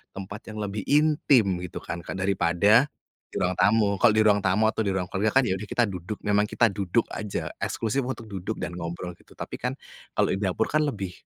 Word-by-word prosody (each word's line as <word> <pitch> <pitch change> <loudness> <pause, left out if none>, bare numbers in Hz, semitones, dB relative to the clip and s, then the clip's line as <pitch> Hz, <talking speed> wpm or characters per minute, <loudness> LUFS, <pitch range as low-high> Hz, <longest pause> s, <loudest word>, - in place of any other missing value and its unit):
tempat 100 +2 -7
yang 110 - -8
lebih 100 0 -4
intim 150 -5 +4 0.2
gitu 90 - -6
kan, 85 - -5
Kak, - - -6
daripada, 100 +6 +3 0.4
di - - -14
ruang 90 +1 0
tamu. 105 -1 +4
Kalau 120 - +6
di - - +6
ruang 105 -1 +4
tamu 95 +3 +3
atau 110 - -2
di 100 - 0
ruang 90 -2 -1
keluarga 105 +3 +1
kan - - +3
ya 95 - +1
udah 100 - -7
kita 120 - +2
duduk 95 +2 -6
memang 105 0 +3
kita 120 - +3
duduk 100 +3 0
aja 105 -2 -4 0.2
eksklusif 115 +4 -1
untuk 120 -3 -5
duduk 100 +1 -4
dan - - -3
ngobrol 85 +1 -5
gitu, - - -20
tapi - - -5
kan, - - -1 0.4
kalau - - +2
di - - -4
dapur 100 +2 0
kan 155 0 +3
lebih, 100 -7 -5
105 Hz, 220 wpm, -26 LUFS, 95-110 Hz, 0.4 s, Kalau